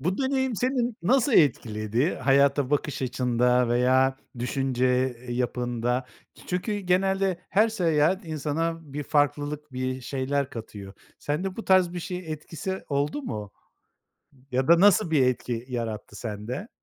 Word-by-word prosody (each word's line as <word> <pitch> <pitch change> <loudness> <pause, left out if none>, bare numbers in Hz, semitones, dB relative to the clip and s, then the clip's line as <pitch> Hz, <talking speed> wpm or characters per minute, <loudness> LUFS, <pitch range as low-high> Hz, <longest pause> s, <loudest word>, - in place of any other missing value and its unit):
Bu 180 +7 -1
deneyim 265 -3 0
seni 250 -1 0
nasıl 250 +7 +3
etkiledi? 115 - +2
Hayata 140 +1 +3
bakış 145 -1 -1
açında 125 -1 +2
veya 130 +2 +3 0.2
düşünce 130 0 0 0.4
yapında. 125 0 -1 0.4
Çünkü 195 +4 -2
genelde 190 -1 +1
her 215 +3 +4
seyahat 175 -2 +1
insana 160 0 -3
bir 145 +1 -3
farklılık, 145 0 0
bir 130 0 -3
şeyler 135 +2 -2
katıyor. 105 -4 -8 0.3
Sende 180 +6 -3
bu 225 - -6
tarz 185 -2 +4
bir 175 - -4
şey 180 +1 -4
etkisi 170 +5 -5
oldu 145 - -1
mu? 105 - -5 1.0
Ya 130 +3 0
da 170 0 +7
nasıl 205 -2 +5
bir 140 -5 +4
etki 120 -2 -2
yarattı 115 -4 -5
sende? 115 - -5
145 Hz, 130 wpm, -26 LUFS, 125-180 Hz, 1.0 s, da